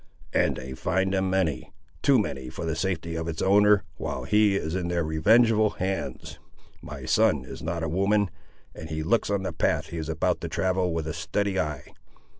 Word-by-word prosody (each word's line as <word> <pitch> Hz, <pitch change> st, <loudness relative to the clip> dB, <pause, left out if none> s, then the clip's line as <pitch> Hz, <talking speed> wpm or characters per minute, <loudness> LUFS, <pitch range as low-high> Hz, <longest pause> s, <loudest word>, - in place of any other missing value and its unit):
"And -, -, +2 dB
they 65 Hz, 0 st, -7 dB
find 95 Hz, +8 st, 0 dB
them 95 Hz, -1 st, +1 dB
many. 90 Hz, -8 st, -1 dB, 0.3 s
Too -, -, +5 dB
many 65 Hz, -2 st, -2 dB
for 85 Hz, -, -6 dB
the 80 Hz, -1 st, -1 dB
safety 85 Hz, -1 st, -2 dB
of 80 Hz, 0 st, -3 dB
its 80 Hz, -1 st, -4 dB
owner, 105 Hz, +1 st, +5 dB
while -, -, -4 dB
he 105 Hz, -1 st, +3 dB
is 80 Hz, -4 st, -2 dB
in 90 Hz, -2 st, -1 dB
their 85 Hz, -1 st, 0 dB
revengeful 110 Hz, +7 st, +3 dB
hands. 95 Hz, -8 st, -4 dB, 0.4 s
My -, -, -8 dB
son 70 Hz, -4 st, +2 dB
is -, -, -9 dB
not 85 Hz, 0 st, -3 dB
a -, -, 0 dB
woman, 100 Hz, +4 st, +1 dB, 0.4 s
and 80 Hz, -, -9 dB
he 80 Hz, 0 st, -3 dB
looks 110 Hz, +6 st, +1 dB
on 100 Hz, -1 st, 0 dB
the -, -, -3 dB
path -, -, 0 dB
he 85 Hz, -, -6 dB
is 80 Hz, -1 st, -4 dB
about 80 Hz, 0 st, 0 dB
to -, -, -4 dB
travel 95 Hz, -1 st, 0 dB
with 80 Hz, -1 st, -2 dB
a 80 Hz, -, -3 dB
steady 95 Hz, +5 st, -1 dB
eye. 75 Hz, -4 st, -4 dB
85 Hz, 200 wpm, -26 LUFS, 80-95 Hz, 0.4 s, Too